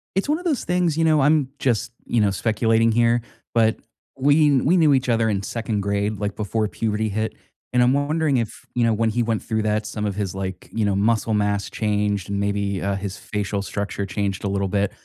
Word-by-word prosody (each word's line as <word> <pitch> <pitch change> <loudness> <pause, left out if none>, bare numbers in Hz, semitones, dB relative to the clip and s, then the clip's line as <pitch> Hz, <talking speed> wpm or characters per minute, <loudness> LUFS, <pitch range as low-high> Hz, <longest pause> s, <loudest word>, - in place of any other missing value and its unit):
It's 195 +8 0
one 305 - +2
of 360 - -10
those 310 -7 0
things, 180 -3 +1
you 165 - +2
know, 155 -2 +4
I'm 145 -1 +3
just, 120 -1 0
you 120 - +1
know, 105 -2 +3
speculating 115 +3 +2
here, 120 +1 +3 0.3
but 110 -1 +3 0.4
we 145 0 +4
we 165 +8 +3
knew 155 -5 +5
each 130 -1 +1
other 115 -1 +2
in 100 -2 0
2nd 110 -1 -2
grade, 100 +1 -1
like, 105 -1 -2
before 110 +1 -1
puberty 110 0 -1
hit, 110 +1 -2 0.4
and 125 - +4
I'm 125 +1 +4
wondering 145 0 +1
if, 115 -3 -4
you 120 -1 +2
know, 115 - +3
when 115 +1 +1
he 120 +2 0
went 115 -1 -1
through 110 -2 -1
that, 105 0 0
some 105 -1 -3
of 100 - -2
his, 100 -3 -2
like, 95 -1 -5
you 110 -2 0
know, 100 -1 +1
muscle 110 +1 +1
mass 105 -1 0
changed 105 -3 -1
and 100 0 -1
maybe, 100 -1 -1
uh, 100 0 0
his 95 -1 -5
facial 105 -1 -3
structure 100 0 -3
changed 100 0 -2
a - - 0
little 100 0 -1
bit. 100 0 0
110 Hz, 225 wpm, -22 LUFS, 100-125 Hz, 0.4 s, knew